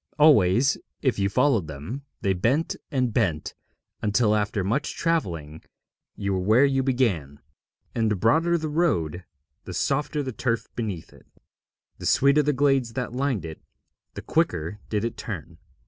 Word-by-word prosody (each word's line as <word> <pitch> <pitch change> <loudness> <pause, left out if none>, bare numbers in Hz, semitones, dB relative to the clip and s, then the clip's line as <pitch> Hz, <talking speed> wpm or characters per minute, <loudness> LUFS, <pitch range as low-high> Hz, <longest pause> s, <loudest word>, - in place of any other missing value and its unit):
Always, 135 -4 +5 0.2
if 130 -7 +1
you 100 0 +2
followed 110 - +2
them, 80 - -7 0.2
they 95 - +2
bent 120 - +1
and 125 -4 0
bent 85 -10 0 0.5
until 105 +1 +2
after 105 -1 0
much 115 +10 -1
travelling 85 - -1 0.5
you 100 -1 -2
were 95 - 0
where 110 +9 +4
you 135 -1 +2
began; 110 - 0 0.5
and 115 -2 +1
the 105 - +1
broader 160 - +3
the 160 -1 -3
road, 95 - 0 0.4
the - - -6
softer 145 +1 0
the 130 - -4
turf 115 -2 -1
beneath 105 -8 -4
it; - - -19 0.7
the - - -3
sweeter 140 +2 +4
the 150 0 +1
glades 135 -4 +2
that 125 -1 -3
lined 130 - -1
it, 80 -1 -8 0.5
the - - -7
quicker 95 - 0
did 105 0 0
it 115 - -4
turn. 85 -5 -7
115 Hz, 155 wpm, -25 LUFS, 95-140 Hz, 0.7 s, Always